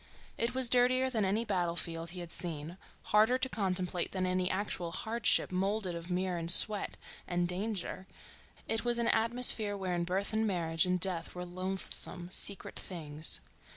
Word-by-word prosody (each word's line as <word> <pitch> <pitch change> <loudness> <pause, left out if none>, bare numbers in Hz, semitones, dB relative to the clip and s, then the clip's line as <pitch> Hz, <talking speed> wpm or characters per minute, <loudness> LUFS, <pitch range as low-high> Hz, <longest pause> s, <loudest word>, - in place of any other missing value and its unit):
It 235 +2 -2
was 260 -1 +4
dirtier 255 +2 +3
than 220 -4 0
any 210 +5 0
battle 175 -5 -1
field 165 -1 -2
he 180 +1 -7
had 170 -1 -8
seen, 165 0 -5 0.4
harder 220 +4 +5
to 260 - -1
contemplate 185 -6 -2
than 185 -1 -1
any 185 0 0
actual 185 -3 -2
hardship 225 +3 +1
moulded 195 0 -1
of 170 +1 -7
mire 180 0 -1
and 165 0 -4
sweat 205 +3 +6 0.3
and 175 0 0
danger, 190 0 -4 0.6
it 225 - -1
was 240 -1 +1
an 235 -1 +1
atmosphere 225 -2 +4
wherein 180 -3 -2
birth 190 +4 -2
and 220 0 +1
marriage 165 -3 0
and 180 0 +1
death 180 -3 -1
were 180 0 -5
loathsome, 185 -1 -3
secret 200 +1 0
things. 155 -4 -3
185 Hz, 165 wpm, -32 LUFS, 175-220 Hz, 0.6 s, sweat